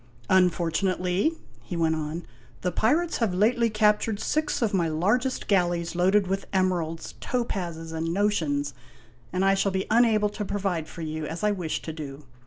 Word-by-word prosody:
" 120 0 -27
Unfortunately," 185 - +2 0.3
he 175 - -5
went 165 -1 +2
on, 155 +2 -4 0.2
" 120 -1 -27
the 180 - +1
pirates 310 - +1
have 215 -7 0
lately 230 +4 +3
captured 210 0 +2
six 310 +5 0
of 215 - 0
my 175 -4 +2
largest 210 - 0
galleys 175 -4 +1
loaded 190 +3 +3
with 195 +1 -2
emeralds, 175 -4 -1
topazes, 175 -10 -3
and 165 +1 -2
notions, 160 -8 0 0.6
and 185 +2 +1
I 195 - +5
shall 195 0 +1
be 190 0 -1
unable 220 -2 +4
to 210 0 -5
provide 190 -5 -2
for 165 - -8
you 155 -1 -4
as 165 +6 -5
I 210 - +3
wished 180 -6 -3
to 160 - -4
do. 145 -2 -7
185 Hz, 175 wpm, -26 LUFS, 165-210 Hz, 0.6 s, I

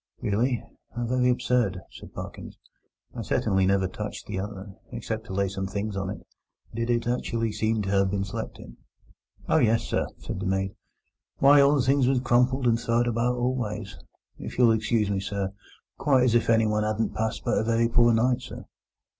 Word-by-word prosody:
"Really? 115 +4 0 0.3
How 120 0 -2
very 125 +1 +2
absurd!" 125 -6 +1
said - - -12
Parkins. - - -8 0.6
"I - - -5
certainly 95 -1 +1
never 95 -1 +2
touched - - -6
the 95 - -4
other, 100 0 -6 0.2
except 115 -2 -5
to - - -6
lay 100 +1 +1
some 95 0 -4
things 100 +1 -3
on 95 -1 -2
it. 100 - -7 0.5
Did 115 +1 -2
it 120 -1 +1
actually 115 -2 -1
seem 110 +1 0
to 95 - -3
have 100 -1 +3
been 100 0 -1
slept 100 - -5
in?" - - -12 0.7
"Oh - - +3
yes, 115 0 +3
sir!" - - -1
said - - -6
the 95 - -3
maid. 95 0 -1 0.6
"Why, 140 +1 +7
all 140 +1 +5
the 135 - +2
things 135 0 +3
was 130 -1 +3
crumpled 125 +1 +2
and 115 -1 +3
throwed 120 +1 +1
about 120 +1 0
all 125 +1 0
ways, 105 - -5 0.4
if - - -7
you'll 120 -2 +6
excuse 110 -1 +1
me, 100 - 0
sir—quite 100 +7 -2
as 125 -3 +3
if 120 -1 +2
anyone 110 -2 +3
'adn't 110 +1 -1
passed 110 0 -2
but - - +2
a - - 0
very 115 +1 +2
poor 120 0 +4
night, 120 +2 +2
sir." - - -9
115 Hz, 190 wpm, -26 LUFS, 100-120 Hz, 0.7 s, Why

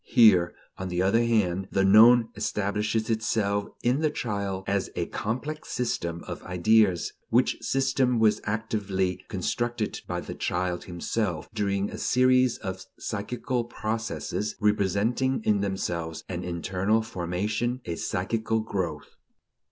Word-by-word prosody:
Here, 95 -7 +5 0.2
on 95 0 -3
the 90 +1 0
other 115 +5 +3
hand, 95 -5 +1
the 95 - +2
known 115 +4 +7
establishes 105 +1 -1
itself 105 -2 0 0.2
in 125 +3 +2
the 155 - +3
child 100 -8 -3
as 100 -1 0
a 85 - -1
complex 130 - -4
system 85 -9 -2
of - - -6
ideas, 90 0 +2 0.2
which - - +2
system 135 -2 +1
was 110 -1 +3
actively 100 -4 -1
constructed 115 +3 -2
by - - -2
the - - -7
child 90 0 -2
himself 90 -1 -2
during 100 -2 -1
a - - -7
series 130 -1 +3
of 95 0 -5
psychical 120 +3 -3
processes, 110 -2 -3
representing 105 +5 +1
in 105 -2 +2
themselves 85 -5 -3
an 90 -1 -4
internal 95 +5 0
formation, 105 +5 -2
a 85 - -3
psychical 110 +5 -1
growth. 90 -8 -4
105 Hz, 130 wpm, -27 LUFS, 95-115 Hz, 0.2 s, known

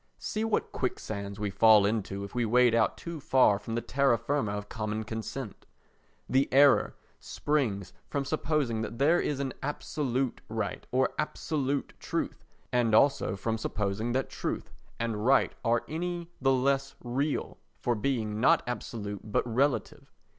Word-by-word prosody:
See 215 - -3
what 225 -1 0
quicksands 100 -6 -4
we 105 -1 -2
fall 105 +1 +6
into 100 -2 -1
if 100 - -8
we 120 0 0
wade 120 +1 +4
out 115 -1 +2
too 170 -2 -6
far 130 -8 +4
from 115 +2 -5
the 120 - 0
terra 135 -2 +2
firma 135 -8 -1
of 105 0 -4
common 110 0 -3
consent! 110 +2 -6 0.6
The 135 +1 +2
error 140 +1 +5 0.2
springs 110 -11 -1
from 140 -1 -2
supposing 145 -6 0
that 115 +1 -5
there 155 +7 +4
is 145 -2 -1
any 135 -2 -2
absolute 135 -3 -2
right 110 -4 -3
or 130 +1 +2
absolute 145 -2 -1
truth, - - -3 0.3
and 120 -3 +3
also 135 -6 +3
from 110 +3 -2
supposing 105 +3 -2
that 130 +1 0
truth - - -4 0.3
and 115 -3 -2
right 135 +3 +4
are 115 -1 +2
any 175 +1 -4
the 135 0 +4
less 135 +1 +1
real 135 +5 -2 0.2
for 120 - 0
being 110 -2 -1
not 165 +8 +4
absolute 105 -3 -5
but - - +1
relative. 130 +4 0
120 Hz, 155 wpm, -29 LUFS, 110-140 Hz, 0.6 s, fall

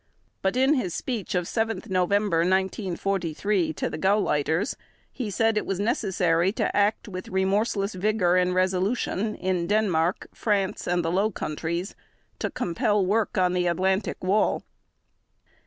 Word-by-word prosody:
But 190 +3 0
in 265 +3 +4
his 200 - -1
speech 225 -6 -3
of 180 -1 0
7 225 -1 -1
November 190 0 +1
1943 190 -1 0
to - - -2
the 155 - -5
Gauleiters 175 - +1 0.4
he 245 -6 -4
said 225 +2 +1
it - - 0
was 195 -1 -2
necessary 190 -5 +1
to - - -1
act 205 +3 +1
"with 185 -2 -7
remorseless 200 +2 0
vigor 185 -2 +1
and 180 0 +2
resolution" 190 +3 0
in 180 -2 -1
Denmark, 190 -5 +1
France, 200 -3 -1
and 175 -1 +1
the 165 - 0
Low 195 +4 +2
Countries 170 +1 -4 0.5
to - - -1
compel 195 +3 0
work 210 +3 0
on 180 -1 +3
the 180 -1 +1
Atlantic 190 +4 0
Wall. 195 +4 +2
190 Hz, 140 wpm, -26 LUFS, 180-210 Hz, 0.5 s, in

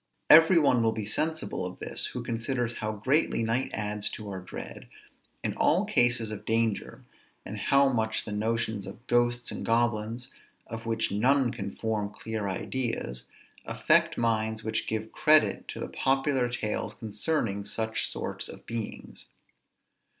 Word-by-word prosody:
Every 165 +3 +9
one 140 -6 +4
will 110 -1 +2
be 110 -2 -4
sensible 160 - -2
of 90 0 -5
this, - - 0
who - - -5
considers 120 +1 -2
how 110 -1 -2
greatly 130 +4 +1
night 115 +4 0
adds 105 -1 0
to 105 -2 -6
our 95 - -4
dread, 90 - -8 0.6
in - - -1
all - - +2
cases 120 -2 +2
of 105 -1 -6
danger, 115 -2 -1 0.4
and 105 - -6
how 140 +7 +4
much 110 -4 0
the 105 - -5
notions 110 -1 -1
of 105 +5 -10
ghosts 120 0 +1
and - - -5
goblins, 115 +1 0 0.4
of 115 0 -7
which 115 -2 0
none 125 +4 +3
can 105 -5 -5
form 110 -2 -1
clear 105 -1 -4
ideas, 105 - -2 0.4
affect - - +2
minds 110 -1 0
which 110 0 -2
give 110 0 -3
credit 155 0 +3
to - - -6
the - - -4
popular 135 -2 +1
tales 110 -3 -2
concerning 110 -1 -1
such 110 +2 -1
sorts - - -4
of - - -11
beings. 115 -2 -6
115 Hz, 150 wpm, -28 LUFS, 105-120 Hz, 0.6 s, Every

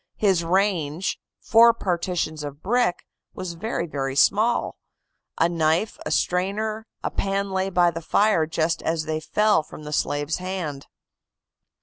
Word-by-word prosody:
His 190 -5 +2
range, 175 -2 0 0.2
four 230 +1 +6
partitions 170 -5 -2
of 145 0 -8
brick, 230 -3 +1 0.3
was 185 -2 -5
very 165 - -3
small; 215 +11 +2 0.6
a 165 - +4
knife, 165 +4 0
a - - -2
strainer, 215 +5 -1 0.2
a - - -2
pan 195 0 -1
lay 190 0 0
by 175 -2 +3
the 165 0 -6
fire 170 -1 +2
just 160 0 0
as 160 -1 -1
they 155 0 -2
fell 210 +4 +2
from 155 - -12
the 150 0 -6
slave's 145 +1 -1
hand." 180 -7 -5
175 Hz, 135 wpm, -24 LUFS, 155-200 Hz, 0.6 s, four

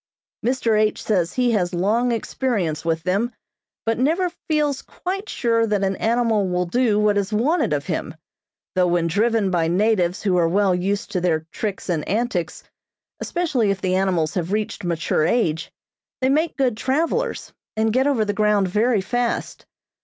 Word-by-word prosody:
Mr. 230 -3 +1
H. 215 0 0
says 180 -6 0
he 250 -1 +2
has 180 -5 0
long 220 +7 +1
experience 210 - -1
with 165 -1 -1
them, 200 +7 0 0.5
but 225 0 0
never 335 +7 +1 0.2
feels 295 -3 +1
quite 390 +3 -5
sure 230 -1 +1
that 205 -2 0
an 195 0 0
animal 225 -4 +1
will 180 0 0
do 220 +3 +1
what 210 -1 +3
is 200 +1 -3
wanted 250 - +1
of 145 -1 -1
him, 160 -2 -3 0.6
though 185 -1 +2
when 175 -1 +1
driven 210 +3 +1
by 170 -2 +1
natives 185 0 +1
who 190 -3 +2
are 170 -1 +3
well 195 +1 +2
used 195 +3 -2
to 180 - -1
their 165 -3 +1
tricks 205 -3 -4
and 165 -5 -1
antics, 205 -6 -2 0.6
especially 290 - 0
if 195 -1 0
the 185 -1 -1
animals 185 -4 +1
have 175 -1 -2
reached 210 -1 -2
mature 170 -2 0
age, 165 -5 0 0.5
they 260 - +1
make 310 +4 +1
good 255 -5 +1
travelers, 330 - -1 0.2
and 220 0 +1
get 260 +3 +3
over 245 -7 +2
the 205 - -1
ground 210 -2 +2
very 215 +3 +2
fast. 245 +4 -2
210 Hz, 170 wpm, -22 LUFS, 180-240 Hz, 0.6 s, what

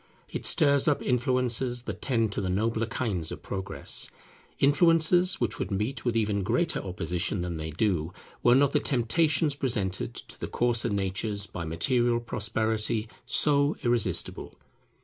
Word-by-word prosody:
It - - -3
stirs 140 -2 +3
up 150 - +2
influences 125 -1 0
that - - -6
tend 115 -5 +1
to 100 - -2
the 95 - -2
nobler 110 +4 0
kinds 100 -9 -2
of - - -8
Progress; 95 0 -3 0.5
influences 165 +5 +4
which 115 -3 -1
would - - -2
meet 110 +6 -2
with 120 -2 0
even 105 -2 0
greater 125 - 0
opposition 90 0 -2
than 85 -2 -3
they 80 0 -5
do, 85 -1 0 0.3
were 120 0 +5
not 140 +1 +4
the - - +3
temptations 150 +4 +1
presented 110 -9 -1
to - - -10
the - - -4
coarser 120 -1 +1
natures 100 +1 -2
by 85 -4 -6
material 120 +9 +1
prosperity 110 -1 -1 0.2
so 145 0 +3
irresistible. 120 -3 -1
115 Hz, 150 wpm, -27 LUFS, 100-130 Hz, 0.5 s, were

